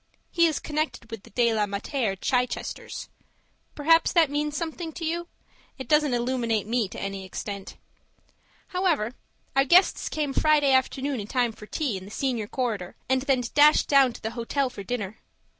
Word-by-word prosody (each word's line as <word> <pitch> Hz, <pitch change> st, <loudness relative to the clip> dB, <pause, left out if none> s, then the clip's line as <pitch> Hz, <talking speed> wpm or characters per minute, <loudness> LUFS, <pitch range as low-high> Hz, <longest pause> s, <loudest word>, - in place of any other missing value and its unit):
He 340 Hz, -1 st, +4 dB
is 315 Hz, -, -1 dB
connected 300 Hz, -6 st, -3 dB
with 225 Hz, -3 st, -6 dB
the -, -, -16 dB
De 235 Hz, +1 st, +2 dB
la 210 Hz, -1 st, +1 dB
Mater 200 Hz, +2 st, -2 dB
Chichesters. 250 Hz, +5 st, -2 dB, 0.7 s
Perhaps 330 Hz, +3 st, +4 dB
that 325 Hz, -5 st, +4 dB
means 295 Hz, 0 st, -1 dB
something 330 Hz, 0 st, -4 dB
to 335 Hz, 0 st, -5 dB
you? 340 Hz, +2 st, -2 dB, 0.5 s
It 265 Hz, -, -7 dB
doesn't 300 Hz, -4 st, +3 dB
illuminate 235 Hz, -3 st, 0 dB
me 230 Hz, -1 st, 0 dB
to -, -, -9 dB
any 195 Hz, -1 st, -4 dB
extent. 195 Hz, +1 st, -7 dB, 0.9 s
However 345 Hz, -, 0 dB, 0.4 s
our 270 Hz, -, +5 dB
guests 350 Hz, +7 st, +4 dB
came 295 Hz, -3 st, -2 dB
Friday 300 Hz, -2 st, +3 dB
afternoon 265 Hz, 0 st, +1 dB
in 205 Hz, -, -6 dB
time 245 Hz, -1 st, +1 dB
for 215 Hz, -1 st, -13 dB
tea 265 Hz, -9 st, -2 dB
in 185 Hz, -, -9 dB
the -, -, -10 dB
senior 235 Hz, -2 st, -2 dB
corridor, 215 Hz, -8 st, -3 dB
and 260 Hz, 0 st, +2 dB
then 265 Hz, -2 st, +1 dB
dashed 295 Hz, +1 st, +6 dB
down 275 Hz, -3 st, +5 dB
to -, -, -11 dB
the 220 Hz, -, -2 dB
hotel 250 Hz, +3 st, -1 dB
for 225 Hz, -, -8 dB
dinner. 215 Hz, -1 st, -4 dB
260 Hz, 175 wpm, -26 LUFS, 220-300 Hz, 0.9 s, dashed